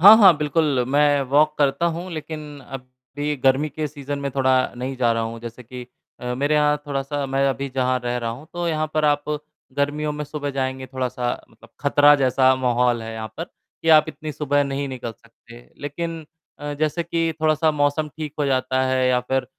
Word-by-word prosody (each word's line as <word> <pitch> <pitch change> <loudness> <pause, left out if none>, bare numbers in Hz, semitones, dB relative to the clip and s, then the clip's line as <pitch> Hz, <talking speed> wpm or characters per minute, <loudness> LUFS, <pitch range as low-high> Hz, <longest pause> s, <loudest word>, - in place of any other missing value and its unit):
हाँ, 205 +5 +11
हाँ, 195 -7 +7
बिल्कुल, 150 -4 +1
मैं 145 +1 +4
वॉक 150 +2 +4
करता 145 +4 +2
हूँ, 170 +2 -3
लेकिन 150 -2 -7
अब 130 -1 -8 0.3
भी 150 +1 -1
गर्मी 135 +3 +2
के 150 +1 -3
सीज़न 145 -1 -5
में 140 0 -3
थोड़ा 130 -1 +3 0.2
नहीं 130 +2 -4
जा 120 -2 +2
रहा 115 0 0
हूँ 115 0 -5
जैसे 115 +1 -8
कि 125 +1 -9 0.3
अ, 125 0 -3
मेरे 145 +4 +1
यहाँ 150 0 +3
थोड़ा-सा 140 0 -2
मैं 135 +1 +1
अभी 135 +1 -2
जहाँ 130 -1 +1
रह 120 0 -1
रहा 115 -1 -2
हूँ 130 +7 -9
तो 175 0 -3
यहाँ 155 -1 0
पर 155 -1 +2
आप 145 -1 +2 0.5
गर्मियों 150 +1 0
में 150 0 -4
सुबह 145 -1 -4
जाएँगे 130 -1 -3
थोड़ा-सा 125 -2 -2 0.2
मतलब 115 - -19
खतरा 145 0 +6
जैसा 130 -1 +4
माहौल 125 -2 +1
है 115 0 -6
यहाँ 110 -1 -5
पर, 165 - -3
कि 165 - -10
आप 155 0 +7
इतनी 155 -1 -6
सुबह 145 0 +1
नहीं 140 0 -3
निकल 125 -3 -5
सकते, 115 +1 -18
लेकिन 165 +3 -4 0.3
अ, 145 0 -4
जैसे 155 +3 0
कि 165 -1 -1
थोड़ा-सा 155 0 +3
मौसम 150 +1 0
ठीक 155 -2 -5
हो 150 - +1
जाता 130 -1 +1
है 130 0 +2
या 125 -1 +3
फिर 130 +1 -1
140 Hz, 200 wpm, -22 LUFS, 130-150 Hz, 0.5 s, हाँ